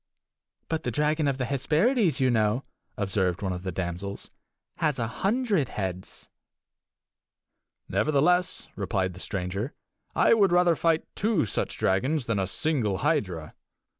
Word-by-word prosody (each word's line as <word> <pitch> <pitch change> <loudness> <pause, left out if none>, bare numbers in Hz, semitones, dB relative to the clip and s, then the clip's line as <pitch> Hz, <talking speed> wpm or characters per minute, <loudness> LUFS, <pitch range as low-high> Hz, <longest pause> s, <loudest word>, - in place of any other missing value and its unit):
"But 160 -1 -1
the - - -2
dragon 150 +4 +1
of 135 -2 0
the 130 - -1
Hesperides, 160 - +2
you 130 -1 +3
know," 110 +2 +2 0.3
observed 95 -3 0
one 95 -1 -1
of 90 - -5
the 95 0 -3
damsels, 90 +3 -5 0.5
"has 150 -4 +1
a 115 - 0
hundred 195 - 0
heads!" 95 -2 -5 1.6
"Nevertheless," 180 +5 +2
replied 95 -2 -1
the 90 - -11
stranger, 100 +7 -3 0.4
"I - - +5
would 200 -5 +4
rather 175 -1 +4
fight 165 0 +1
two 210 - +1
such 105 - -2
dragons 130 +9 +1
than 115 -4 0
a 95 - 0
single 115 - 0
hydra." 95 - 0
130 Hz, 135 wpm, -27 LUFS, 95-160 Hz, 1.6 s, I